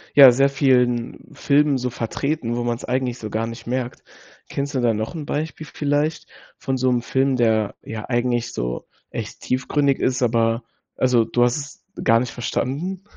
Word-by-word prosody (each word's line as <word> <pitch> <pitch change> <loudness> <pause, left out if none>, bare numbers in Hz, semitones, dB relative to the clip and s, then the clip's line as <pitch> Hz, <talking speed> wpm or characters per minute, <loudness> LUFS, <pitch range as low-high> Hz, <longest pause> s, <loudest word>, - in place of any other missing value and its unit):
ja 135 -3 +11
sehr 135 +3 +3
vielen 125 -4 +2
Filmen 145 -1 +3
so 125 0 -2
vertreten, 120 +2 -2
wo 120 - -1
man's 120 0 -2
eigentlich 125 -1 -1
so 110 - -5
gar 110 +2 -1
nicht 115 0 -9
merkt. 125 0 -3 0.5
Kennst 140 +1 -3
du - - +2
da 120 -2 +2
noch 110 +8 -3
'n 155 -3 -5
Beispiel 155 +1 -3
vielleicht 150 +2 -1 0.3
von 135 -1 -2
so 130 0 +2
'nem 120 -1 +1
Film, 130 +3 +1
der, 110 -4 +2
ja, 110 -1 -6
eigentlich 120 -1 0
so - - -3 0.2
echt - - -6
tiefgründig 135 +2 +1
ist, 125 0 0
aber 115 -1 +2 0.3
also, 125 -3 +3
du 120 - +2
hast 120 +2 +2
es 145 0 -9 0.2
gar 115 +1 +5
nicht 125 0 -3
verstanden? 150 +10 -3
125 Hz, 180 wpm, -22 LUFS, 120-140 Hz, 0.5 s, ja